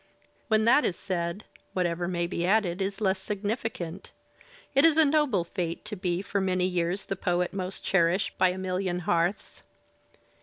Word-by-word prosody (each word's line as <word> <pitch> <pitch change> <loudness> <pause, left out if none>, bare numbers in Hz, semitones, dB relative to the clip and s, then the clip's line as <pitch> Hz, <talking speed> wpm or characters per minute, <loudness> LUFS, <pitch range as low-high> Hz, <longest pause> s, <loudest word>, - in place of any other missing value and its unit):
When 220 -1 +3
that 260 +6 +5
is 175 - 0
said, 175 +2 -3 0.3
whatever 175 -1 0
may 175 -1 -1
be 170 0 -3
added 190 -1 +2
is 195 +2 -3
less 190 -2 +1
significant. 200 -3 -4 0.6
It 275 - +4
is 325 -1 +5
a 320 - +7
noble 285 - +2
fate 170 -1 -4
to 210 - -5
be 180 -1 -2
for 200 0 -1
many 185 -1 +1
years 180 +1 -1
the 195 - -3
poet 180 -1 0
most 190 -1 -4
cherished 185 +1 +2
by 185 - +5
a 180 - -3
million 185 -1 -2
hearths. 175 0 -1
185 Hz, 165 wpm, -28 LUFS, 175-205 Hz, 0.6 s, a